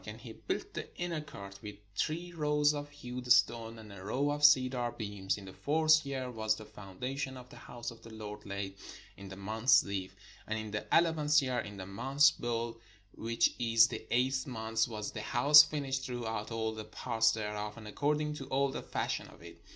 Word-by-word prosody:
And 105 Hz, +1 st, -7 dB
he 115 Hz, -2 st, -9 dB
built 110 Hz, -, -4 dB
the -, -, -5 dB
inner 170 Hz, -3 st, -2 dB
court 100 Hz, -10 st, -10 dB
with 105 Hz, -1 st, -7 dB, 0.2 s
three 170 Hz, +9 st, -2 dB
rows 150 Hz, -2 st, +2 dB
of 145 Hz, 0 st, -5 dB
hewed 125 Hz, -3 st, -6 dB
stone, 115 Hz, -1 st, +3 dB
and 110 Hz, -2 st, -11 dB
a 95 Hz, -2 st, -10 dB
row 135 Hz, +8 st, 0 dB
of 145 Hz, 0 st, -3 dB
cedar 130 Hz, -4 st, +5 dB
beams. 100 Hz, -3 st, -2 dB
In 100 Hz, -, -10 dB
the 95 Hz, -, -10 dB
fourth 155 Hz, +4 st, +3 dB
year 130 Hz, -2 st, -3 dB
was 110 Hz, -2 st, 0 dB
the 110 Hz, -, -10 dB
foundation 125 Hz, +7 st, -5 dB
of 125 Hz, 0 st, -12 dB
the -, -, -13 dB
house 120 Hz, -1 st, -7 dB
of 115 Hz, -, -14 dB
the 115 Hz, -, -12 dB
Lord 105 Hz, -1 st, -8 dB
laid, 100 Hz, -1 st, -5 dB, 0.4 s
in 100 Hz, 0 st, -10 dB
the 95 Hz, -, -8 dB
month 110 Hz, +5 st, -4 dB
Zif: 100 Hz, -6 st, +4 dB, 0.4 s
and 110 Hz, -, -1 dB
in 110 Hz, -1 st, -5 dB
the 105 Hz, 0 st, -4 dB
eleventh 155 Hz, -3 st, +4 dB
year, 130 Hz, -2 st, 0 dB
in 105 Hz, -1 st, -6 dB
the 95 Hz, -, -6 dB
month 135 Hz, +9 st, +3 dB
Bui, 115 Hz, -1 st, -2 dB, 0.4 s
which 115 Hz, +1 st, +1 dB
is 115 Hz, -1 st, +5 dB
the -, -, -7 dB
eighth 130 Hz, +2 st, +1 dB
month, 110 Hz, -2 st, -1 dB
was 105 Hz, -3 st, -5 dB
the 110 Hz, -, -5 dB
house 145 Hz, +7 st, +8 dB
finished 140 Hz, -3 st, -2 dB
throughout 120 Hz, -3 st, -4 dB
all 110 Hz, -1 st, -2 dB
the 110 Hz, -1 st, -7 dB
parts 115 Hz, +1 st, +1 dB
thereof, 105 Hz, 0 st, -4 dB
and 110 Hz, -2 st, -9 dB
according 150 Hz, +6 st, 0 dB
to 135 Hz, -3 st, -7 dB
all 140 Hz, +1 st, +1 dB
the -, -, -4 dB
fashion -, -, -3 dB
of -, -, -16 dB
it. -, -, -12 dB
120 Hz, 205 wpm, -32 LUFS, 105-140 Hz, 0.4 s, house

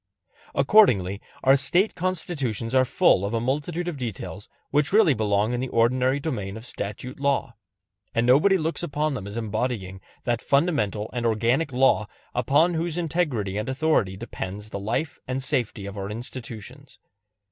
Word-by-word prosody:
Accordingly 100 Hz, -, +4 dB, 0.2 s
our 135 Hz, +1 st, +6 dB
State 175 Hz, +10 st, +2 dB
Constitutions 155 Hz, -, -2 dB
are 130 Hz, 0 st, +5 dB
full 100 Hz, -5 st, +3 dB
of 100 Hz, +3 st, -1 dB
a -, -, +1 dB
multitude 150 Hz, +8 st, -2 dB
of 170 Hz, -4 st, -3 dB
details 110 Hz, -4 st, -6 dB, 0.2 s
which 150 Hz, +1 st, +2 dB
really 205 Hz, -7 st, +5 dB
belong 105 Hz, 0 st, +1 dB
in 120 Hz, -, -1 dB
the 130 Hz, -, -2 dB
ordinary 125 Hz, +3 st, +2 dB
domain 110 Hz, -10 st, -4 dB
of 110 Hz, -, -10 dB
statute 125 Hz, +4 st, -6 dB
law; 140 Hz, -3 st, 0 dB, 0.6 s
and 115 Hz, -, +2 dB
nobody 150 Hz, +11 st, +5 dB
looks 165 Hz, -1 st, -2 dB
upon 150 Hz, -2 st, -1 dB
them 100 Hz, -6 st, -5 dB
as 100 Hz, +3 st, -6 dB
embodying 110 Hz, -4 st, -3 dB, 0.2 s
that 120 Hz, -2 st, 0 dB
fundamental 115 Hz, -, +1 dB
and 120 Hz, -1 st, -2 dB
organic 120 Hz, +7 st, +1 dB
law 125 Hz, -4 st, +3 dB, 0.3 s
upon 145 Hz, +8 st, +3 dB
whose 165 Hz, 0 st, -2 dB
integrity 145 Hz, -, -1 dB
and 110 Hz, -, -3 dB
authority 130 Hz, -9 st, +1 dB
depends 105 Hz, -1 st, -6 dB
the 100 Hz, -, -4 dB
life 115 Hz, +10 st, -2 dB
and 130 Hz, +1 st, -2 dB
safety 115 Hz, -6 st, -1 dB
of 100 Hz, 0 st, -7 dB
our 100 Hz, -1 st, -4 dB
institutions. 120 Hz, +2 st, -8 dB
125 Hz, 160 wpm, -25 LUFS, 105-150 Hz, 0.6 s, our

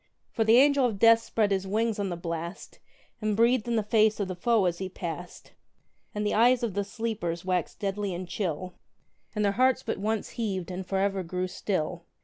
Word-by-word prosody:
For 225 Hz, -, +1 dB
the 220 Hz, +2 st, +5 dB
Angel 280 Hz, -1 st, +5 dB
of 220 Hz, -4 st, -4 dB
Death 230 Hz, +2 st, +6 dB
spread 215 Hz, -2 st, 0 dB
his 195 Hz, 0 st, 0 dB
wings 220 Hz, +2 st, 0 dB
on 200 Hz, -1 st, -1 dB
the 175 Hz, -, -4 dB
blast, 170 Hz, +1 st, -6 dB, 0.4 s
And 215 Hz, -1 st, 0 dB
breathed 235 Hz, 0 st, +3 dB
in 235 Hz, -, 0 dB
the 220 Hz, -, +1 dB
face 215 Hz, 0 st, +3 dB
of 200 Hz, -, -1 dB
the 185 Hz, -, -4 dB
foe 220 Hz, +2 st, +2 dB
as 175 Hz, -1 st, 0 dB
he 190 Hz, -1 st, -4 dB
passed; 175 Hz, -1 st, -7 dB, 0.6 s
And 210 Hz, 0 st, -1 dB
the 210 Hz, -, +1 dB
eyes 240 Hz, +3 st, +4 dB
of 225 Hz, -5 st, -1 dB
the 200 Hz, +1 st, 0 dB
sleepers 200 Hz, -6 st, -4 dB
waxed 180 Hz, -3 st, -1 dB
deadly 200 Hz, 0 st, -2 dB
and 180 Hz, +1 st, -6 dB
chill, 180 Hz, -1 st, -3 dB, 0.6 s
And 210 Hz, 0 st, +1 dB
their 200 Hz, -, +3 dB
hearts 255 Hz, +4 st, +2 dB
but -, -, -3 dB
once 215 Hz, +1 st, -1 dB
heaved, 190 Hz, -6 st, -3 dB
and 180 Hz, 0 st, -5 dB
for 195 Hz, -, -1 dB
ever 195 Hz, 0 st, +1 dB
grew 180 Hz, +1 st, -3 dB
still! 175 Hz, -2 st, -3 dB
200 Hz, 210 wpm, -28 LUFS, 185-225 Hz, 0.6 s, Death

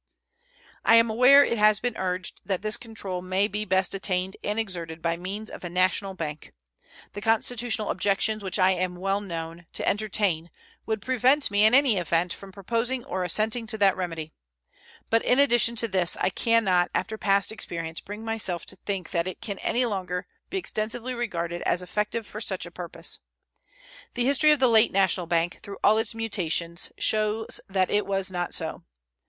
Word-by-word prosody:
I 230 Hz, -, +6 dB
am 230 Hz, -1 st, +5 dB
aware 255 Hz, +5 st, +7 dB
it 235 Hz, -5 st, -1 dB
has 215 Hz, 0 st, +5 dB
been 245 Hz, -1 st, -2 dB
urged 185 Hz, 0 st, -3 dB
that 190 Hz, -1 st, -1 dB
this 215 Hz, 0 st, +1 dB
control 205 Hz, -6 st, -5 dB
may 185 Hz, +2 st, +1 dB
be 210 Hz, 0 st, -3 dB
best 190 Hz, -1 st, +1 dB
attained 190 Hz, -1 st, -2 dB
and 210 Hz, +1 st, -1 dB
exerted 170 Hz, -7 st, -3 dB
by 165 Hz, 0 st, 0 dB
means 195 Hz, +5 st, -6 dB
of -, -, -8 dB
a 175 Hz, -, -4 dB
national 185 Hz, +2 st, +1 dB
bank. 155 Hz, -4 st, -6 dB, 0.6 s
The 205 Hz, -, -6 dB
constitutional 225 Hz, 0 st, +1 dB
objections 205 Hz, +1 st, 0 dB
which 190 Hz, 0 st, -2 dB
I 185 Hz, -1 st, +5 dB
am 180 Hz, -1 st, -1 dB
well 195 Hz, +2 st, -1 dB
known 165 Hz, -3 st, -6 dB
to -, -, -2 dB
entertain 200 Hz, -5 st, 0 dB, 0.4 s
would 220 Hz, -3 st, -2 dB
prevent 260 Hz, +1 st, +3 dB
me 205 Hz, +1 st, +4 dB
in 220 Hz, +3 st, +6 dB
any 270 Hz, -6 st, +4 dB
event 170 Hz, 0 st, 0 dB
from 195 Hz, -1 st, -9 dB
proposing 230 Hz, +6 st, -1 dB
or 185 Hz, -, -2 dB
assenting 220 Hz, +5 st, +1 dB
to 220 Hz, 0 st, -1 dB
that 200 Hz, -2 st, +4 dB
remedy; 165 Hz, -4 st, -5 dB, 0.8 s
but 225 Hz, 0 st, +3 dB
in 250 Hz, -, +3 dB
addition 240 Hz, -4 st, +4 dB
to 230 Hz, 0 st, 0 dB
this, 185 Hz, -4 st, 0 dB
I -, -, +1 dB
can 230 Hz, +4 st, +2 dB
not 180 Hz, -3 st, +3 dB
after 220 Hz, -, -1 dB
past 200 Hz, -2 st, +1 dB
experience 165 Hz, -6 st, -5 dB
bring 210 Hz, +2 st, -8 dB
myself 215 Hz, -6 st, -2 dB
to -, -, -5 dB
think 195 Hz, -4 st, -4 dB
that 170 Hz, -1 st, 0 dB
it 185 Hz, -, -6 dB
can 200 Hz, -3 st, -5 dB
any 245 Hz, +1 st, +1 dB
longer 185 Hz, -4 st, -3 dB, 0.2 s
be 385 Hz, -, -2 dB
extensively 235 Hz, -, -3 dB
regarded 175 Hz, -8 st, -3 dB
as 180 Hz, +1 st, 0 dB
effective 210 Hz, +4 st, -2 dB
for 215 Hz, -, -8 dB
such 190 Hz, -5 st, -3 dB
a 175 Hz, -, -10 dB
purpose. 175 Hz, -1 st, -7 dB, 1.0 s
The 245 Hz, -1 st, 0 dB
history 280 Hz, +3 st, +4 dB
of 300 Hz, -1 st, +5 dB
the 260 Hz, -, +5 dB
late 225 Hz, -1 st, +5 dB
national 185 Hz, -2 st, +2 dB
bank, 170 Hz, +1 st, 0 dB
through 200 Hz, -, -8 dB
all 215 Hz, +2 st, +5 dB
its 225 Hz, 0 st, -2 dB
mutations, 175 Hz, -6 st, -2 dB
shows 215 Hz, +1 st, 0 dB
that 190 Hz, -1 st, +1 dB
it 205 Hz, -1 st, +1 dB
was 195 Hz, -1 st, -1 dB
not 175 Hz, -1 st, -2 dB
so. -, -, -2 dB
200 Hz, 185 wpm, -26 LUFS, 180-225 Hz, 1.0 s, aware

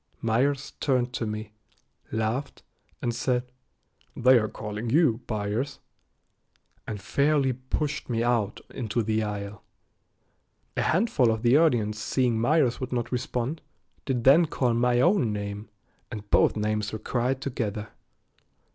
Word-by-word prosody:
Myers 135 Hz, +5 st, 0 dB
turned 125 Hz, -3 st, +1 dB
to 115 Hz, -, -2 dB
me, 105 Hz, 0 st, -5 dB, 0.6 s
laughed, 110 Hz, +5 st, -2 dB, 0.4 s
and 120 Hz, -, 0 dB
said, 125 Hz, +1 st, -1 dB, 0.6 s
"They 125 Hz, 0 st, +6 dB
are 110 Hz, -, -1 dB
calling 105 Hz, +1 st, -5 dB
you, 135 Hz, -4 st, +3 dB
Byers," 110 Hz, +6 st, -2 dB, 1.1 s
and 105 Hz, -, -4 dB
fairly 140 Hz, +6 st, +2 dB
pushed 130 Hz, +4 st, -3 dB
me 115 Hz, -1 st, 0 dB
out 115 Hz, -4 st, 0 dB
into 120 Hz, -2 st, -2 dB
the 110 Hz, +1 st, 0 dB
aisle. 105 Hz, -1 st, -5 dB, 1.1 s
A -, -, 0 dB
handful 160 Hz, -, +2 dB
of 110 Hz, 0 st, -1 dB
the 120 Hz, +2 st, +5 dB
audience 120 Hz, -10 st, +3 dB
seeing 120 Hz, 0 st, +1 dB
Myers 135 Hz, -1 st, +2 dB
would 130 Hz, 0 st, -4 dB
not 120 Hz, -2 st, -2 dB
respond, 125 Hz, +4 st, -2 dB, 0.4 s
did 125 Hz, -4 st, -1 dB
then 155 Hz, +6 st, +6 dB
call 125 Hz, -5 st, 0 dB
my 120 Hz, +1 st, +2 dB
own 175 Hz, -, +3 dB
name, 100 Hz, +1 st, -5 dB, 0.4 s
and 105 Hz, -1 st, -7 dB
both -, -, +4 dB
names 105 Hz, 0 st, -1 dB
were 110 Hz, -, -3 dB
cried 125 Hz, +4 st, -1 dB
together. 110 Hz, -6 st, -3 dB
120 Hz, 135 wpm, -26 LUFS, 110-130 Hz, 1.1 s, They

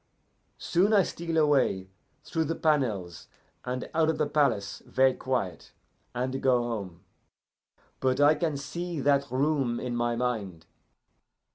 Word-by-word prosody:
Soon 190 Hz, +5 st, +1 dB
I 200 Hz, -2 st, +6 dB
steal 165 Hz, -1 st, -4 dB
away 135 Hz, -11 st, +2 dB, 0.3 s
through 160 Hz, -1 st, -1 dB
the 165 Hz, +2 st, -2 dB
panels, 110 Hz, -, -1 dB, 0.4 s
and 125 Hz, 0 st, -4 dB
out 160 Hz, 0 st, +3 dB
of 160 Hz, -, 0 dB
the 150 Hz, -, +1 dB
palace 140 Hz, -9 st, 0 dB
ver' 130 Hz, 0 st, +3 dB
quiet, 120 Hz, -, -3 dB, 0.4 s
and 130 Hz, +2 st, -2 dB
go 125 Hz, -2 st, +3 dB
home. 100 Hz, -7 st, -5 dB, 1.0 s
But 130 Hz, 0 st, +1 dB
I 145 Hz, +1 st, +6 dB
can 155 Hz, -3 st, -1 dB
see 170 Hz, +4 st, -5 dB
that 140 Hz, 0 st, +2 dB
room 130 Hz, -2 st, 0 dB
in 125 Hz, -1 st, -3 dB
my 120 Hz, 0 st, 0 dB
mind." 105 Hz, -9 st, -3 dB
130 Hz, 135 wpm, -28 LUFS, 120-155 Hz, 1.0 s, I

